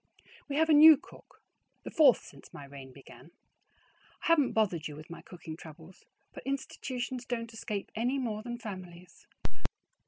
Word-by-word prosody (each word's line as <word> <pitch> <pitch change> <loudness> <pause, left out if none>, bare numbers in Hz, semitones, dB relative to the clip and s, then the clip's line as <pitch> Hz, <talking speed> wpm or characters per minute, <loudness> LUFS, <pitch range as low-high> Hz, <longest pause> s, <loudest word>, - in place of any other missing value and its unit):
We 280 - -2
have 320 +2 +4
a - - +7
new 310 0 +10
cook, - - -18 0.4
the - - -7
fourth 285 -7 +6
since 140 - -14
my 140 - -9
reign 135 -1 -11
began. 135 +2 -14 0.9
I - - -1
haven't 300 -6 +4
bothered 185 -8 +1
you 150 - -8
with 155 +3 -11
my 170 - -8
cooking 165 -3 -9
troubles, 160 +2 -13 0.3
but - - -8
institutions 260 -2 -4
don't 230 -2 -4
escape 210 -2 -4
any 245 +5 0
more 225 -5 -2
than 240 +1 -5
families. 185 -5 -9
215 Hz, 160 wpm, -31 LUFS, 165-260 Hz, 0.9 s, new